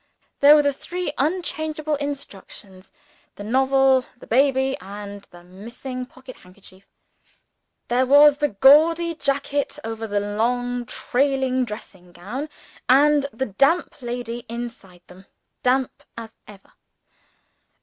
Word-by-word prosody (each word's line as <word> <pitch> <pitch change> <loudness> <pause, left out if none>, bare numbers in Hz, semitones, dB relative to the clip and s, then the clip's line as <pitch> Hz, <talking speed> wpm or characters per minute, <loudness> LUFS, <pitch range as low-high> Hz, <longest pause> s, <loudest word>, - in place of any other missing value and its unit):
There 290 +1 +8
were 300 - +4
the 285 0 +1
three 350 +2 -5
unchangeable 310 -1 -2
institutions 200 -9 -8 0.4
the 205 - -9
novel, 265 +3 +3
the - - -14
baby, 265 +1 +2
and 200 +1 -9
the 175 0 -16
missing 235 +7 -8
pocket 260 0 -14
handkerchief 185 +1 -19 1.0
There 250 +2 +1
was 290 +1 +7
the 295 - +2
gaudy 315 +9 +4
jacket 280 -1 -2
over 225 0 -5
the 205 -1 0
long 240 +4 -2
trailing 265 -1 0
dressing 190 -5 -11
gown 245 - -6 0.4
and 285 +2 +4
the 260 +3 -3
damp 275 - +1
lady 240 -1 -5
inside 230 -7 -8
them, 185 +2 -17 0.3
damp 255 0 0 0.2
as 225 -1 -8
ever! 200 -2 -16
255 Hz, 120 wpm, -22 LUFS, 210-280 Hz, 1.0 s, There